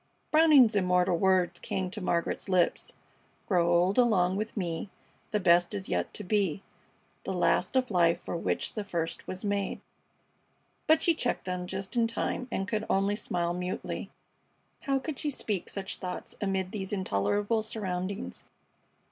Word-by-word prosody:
Browning's 300 -7 +7
immortal 180 -2 +3
words 180 -1 +2
came 185 -1 -3
to 210 +1 -6
Margaret's 170 +2 -1
lips 180 -2 +1 0.6
Grow 175 -3 +3
old 180 +5 +3
along 190 -7 +3
with 215 +3 -4
me, 175 0 -3 0.4
The 210 - 0
best 175 +1 +4
is 195 -1 -4
yet - - -1
to 210 - -4
be, 195 -2 0 0.6
The - - -3
last - - +1
of 255 -3 +2
life 170 -3 +3
for - - -5
which 170 - -1
the 210 - -3
first 170 -4 -3
was 185 +3 -5
made 200 -1 -1 1.1
but 315 0 +5
she 335 - +4
checked 250 -6 -2
them 180 -1 -3
just 190 +5 -5
in 230 -1 +3
time 235 +2 -2
and 195 - -2
could 215 +1 -1
only 195 +1 +2
smile 175 -4 -1
mutely. 180 +1 -4 0.7
How 275 -1 0
could 285 +1 -5
she 300 - -1
speak 210 -8 -3
such 195 -1 -4
thoughts 180 -1 -6
amid 190 -2 -1
these 195 -3 -4
intolerable 205 - 0
surroundings? 195 -2 -4
190 Hz, 155 wpm, -29 LUFS, 180-215 Hz, 1.1 s, Browning's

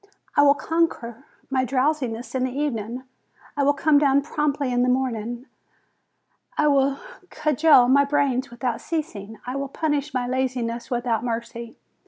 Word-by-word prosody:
I - - +6
will 285 0 +6
conquer 295 -8 -2 0.3
my 260 -1 +2
drowsiness 255 -2 -1
in 260 -1 0
the 260 - -3
evening, 245 -3 -3 0.5
I 290 - 0
will 285 +1 +3
come 290 +1 +4
down 280 -1 +3
promptly 290 -3 -1
in 245 - +2
the 250 - +2
morning, 245 -1 -2 1.1
I 300 - +3
will 275 -1 +2 0.3
cudgel 300 -3 +4
my 280 +2 +5
brains 275 -2 0
without 240 0 -3
ceasing, 225 -10 -5
I 250 +1 -4
will 275 0 -3
punish 295 -1 -1
my 255 -2 -1
laziness 250 -2 -2
without 240 -3 -1
mercy. 235 0 -5
260 Hz, 150 wpm, -23 LUFS, 240-285 Hz, 1.1 s, I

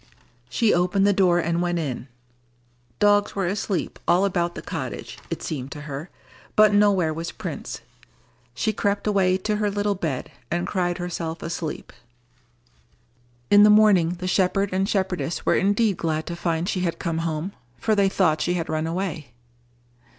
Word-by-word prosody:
She 220 - +2
opened 180 +3 +2
the 205 - +4
door 185 -3 +3
and 170 0 0
went 175 0 0
in. 140 -5 -3 0.9
Dogs 205 0 +3
were 195 -2 0
asleep 195 -1 -2
all 180 +3 +4
about 175 -3 -1
the - - -7
cottage, - - -6
it - - -5
seemed 135 -3 -4
to 150 - -8
her, 145 +3 -6 0.5
but 215 -1 +6
nowhere 200 -6 +3
was 165 +2 -4
Prince. - - -6 0.7
She 215 - 0
crept 200 0 -1
away 190 -3 +3
to 210 +2 -1
her 210 -1 +1
little 205 0 0
bed, 155 -5 -4 0.2
and 175 +1 -1
cried 180 -3 -1
herself 170 -2 -4
asleep. 165 -1 -5 1.6
In 205 - +8
the 210 - +8
morning 205 -5 +5
the 185 +1 -5
shepherd 195 +1 +1
and 190 +2 0
shepherdess 185 -4 -1
were - - +3
indeed 205 +1 +2
glad 160 -1 -1
to 170 - -5
find 170 0 -1
she 190 - -1
had 175 -2 -1
come 165 -1 -2
home, 165 +2 -2 0.3
for 215 - 0
they 200 -2 +3
thought 160 -6 +2
she 175 - 0
had 165 -2 -3
run 155 0 -1
away. 165 -5 -3
180 Hz, 165 wpm, -24 LUFS, 165-200 Hz, 1.6 s, In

